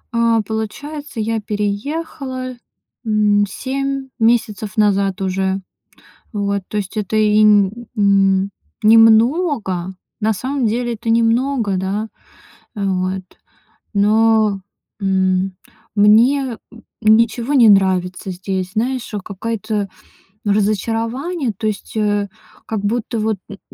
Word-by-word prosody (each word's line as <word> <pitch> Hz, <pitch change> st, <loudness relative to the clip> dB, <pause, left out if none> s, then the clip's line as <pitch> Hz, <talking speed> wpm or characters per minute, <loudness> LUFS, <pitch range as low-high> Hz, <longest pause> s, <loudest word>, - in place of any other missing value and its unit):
А, 230 Hz, -1 st, +3 dB
получается, 235 Hz, +6 st, -5 dB
я 220 Hz, 0 st, -1 dB
переехала, 255 Hz, +5 st, -4 dB, 0.5 s
м, 210 Hz, -2 st, +2 dB
7 275 Hz, +2 st, -3 dB
месяцев 220 Hz, -2 st, +1 dB
назад 200 Hz, -2 st, +2 dB
уже. 190 Hz, 0 st, 0 dB, 0.8 s
Вот, 200 Hz, -1 st, -1 dB
то 210 Hz, -, -5 dB
есть 205 Hz, +1 st, -3 dB
это 210 Hz, +1 st, -2 dB
и 215 Hz, 0 st, +4 dB
н 205 Hz, -2 st, +5 dB, 0.2 s
н 195 Hz, -1 st, +3 dB, 0.3 s
немного. 225 Hz, -, +4 dB, 0.3 s
На 215 Hz, 0 st, +1 dB
самом 260 Hz, +3 st, -2 dB
деле 240 Hz, +2 st, -1 dB
это 225 Hz, +1 st, -7 dB
немного, 230 Hz, -2 st, +2 dB
да. 200 Hz, +4 st, -2 dB, 0.7 s
Э, 200 Hz, -, -2 dB
вот. 185 Hz, 0 st, -1 dB, 0.7 s
Но, 215 Hz, 0 st, +3 dB, 0.4 s
м, 190 Hz, -1 st, +1 dB, 0.4 s
мне, 230 Hz, +5 st, +4 dB, 0.2 s
э, -, -, -14 dB, 0.2 s
ничего 230 Hz, +4 st, +3 dB
не 235 Hz, -5 st, +7 dB
нравится 190 Hz, -1 st, +2 dB
здесь. 185 Hz, 0 st, -4 dB
Знаешь, 245 Hz, +2 st, -2 dB
э, -, -, -1 dB
какая-то 215 Hz, 0 st, -3 dB, 0.6 s
разочарование. 225 Hz, -, 0 dB
То 220 Hz, -, -2 dB
есть, 215 Hz, +1 st, -4 dB
э, 205 Hz, -1 st, 0 dB, 0.4 s
как 220 Hz, -2 st, -3 dB
будто 225 Hz, +2 st, -2 dB
вот 215 Hz, -1 st, 0 dB
н 200 Hz, -, -9 dB
215 Hz, 110 wpm, -18 LUFS, 200-230 Hz, 0.8 s, не